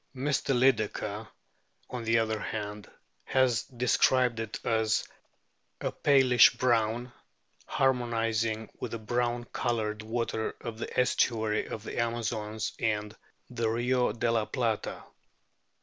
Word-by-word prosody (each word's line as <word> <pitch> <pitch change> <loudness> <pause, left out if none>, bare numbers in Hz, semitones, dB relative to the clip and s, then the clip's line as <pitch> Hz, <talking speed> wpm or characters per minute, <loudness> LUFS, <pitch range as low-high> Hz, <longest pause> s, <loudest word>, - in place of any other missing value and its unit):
Mr. 135 0 0
Lyclekker, 110 -4 +1 0.6
on 125 -2 -4
the 115 +1 +3
other 110 -1 0
hand, 105 -1 -5 0.3
has 130 -5 +2
described 125 -1 +2
it 110 -1 -4
as 110 -1 +1 0.7
a - - -2
palish 130 -3 +5
brown, 120 0 +1 0.6
harmonising 115 -4 0
with - - -5
the - - -2
brown 120 +2 -1
coloured 110 -3 -1
water 110 0 -2
of 115 -2 -6
the - - -3
estuary 110 -4 +1
of 110 - -6
the - - -5
Amazons 110 -2 -2
and 105 -2 -1 0.4
the 115 -2 0
Rio 125 +2 +1
de 115 +2 0
la 115 -2 +1
Plata. 115 -4 -2
115 Hz, 120 wpm, -29 LUFS, 110-125 Hz, 0.7 s, palish